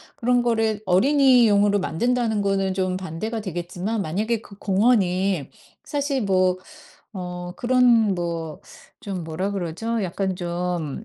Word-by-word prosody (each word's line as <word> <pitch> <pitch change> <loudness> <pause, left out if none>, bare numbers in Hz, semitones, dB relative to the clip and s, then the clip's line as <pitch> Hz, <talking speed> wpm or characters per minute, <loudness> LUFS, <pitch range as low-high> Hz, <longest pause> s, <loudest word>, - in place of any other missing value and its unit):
그런 245 -2 +2
거를 225 -3 0
어린이용으로 215 -2 +4
만든다는 225 +4 0
거는 195 -1 0
좀 185 -1 -1
반대가 190 +5 -4
되겠지만 180 +3 -3
만약에 215 +6 -1
그 200 - -15
공원이 195 - +1 0.3
사실 285 -3 -1
뭐 185 -2 +2 0.6
어 180 -2 -6
그런 240 -5 +4
뭐 165 -3 -4 0.4
좀 190 -5 -5
뭐라 175 +5 -3
그러죠 200 +5 -3
약간 190 +1 -2
좀 175 -1 -3
195 Hz, 255 characters per minute, -23 LUFS, 180-225 Hz, 0.6 s, 어린이용으로